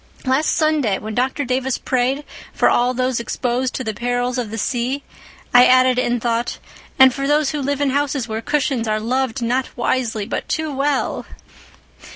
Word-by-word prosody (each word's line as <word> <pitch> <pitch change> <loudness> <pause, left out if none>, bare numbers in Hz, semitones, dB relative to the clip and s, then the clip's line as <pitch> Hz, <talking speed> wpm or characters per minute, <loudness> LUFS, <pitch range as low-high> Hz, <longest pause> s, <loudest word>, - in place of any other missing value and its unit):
Last 265 +4 +2
Sunday, 305 - +1
when 215 +1 -6
Dr. 260 +4 -1
Davis 255 +1 -1
prayed 260 +3 0 0.3
for - - +3
all 245 +1 +2
those 255 -1 0
exposed 250 +2 -2
to 260 - -3
the 220 -2 -3
perils 245 +3 -1
of 235 -4 -3
the 225 - -5
sea, 250 +5 -1 0.5
I 245 0 +8
added 255 0 +4
in 245 -1 0
thought 235 0 -1 0.4
'and 265 -1 +7
for 275 - -6
all 275 - 0
those 295 -1 +2
who 300 -2 -3
live 285 +1 -1
in 280 -2 +2
houses 280 -3 -1
where 220 0 -3
cushions 270 -4 0
are 215 0 0
loved 255 +2 -1
not 250 +3 0
wisely 235 -3 -1
but 235 - -4
too 315 -2 -2
well! 275 0 -1
255 Hz, 185 wpm, -20 LUFS, 240-275 Hz, 0.5 s, I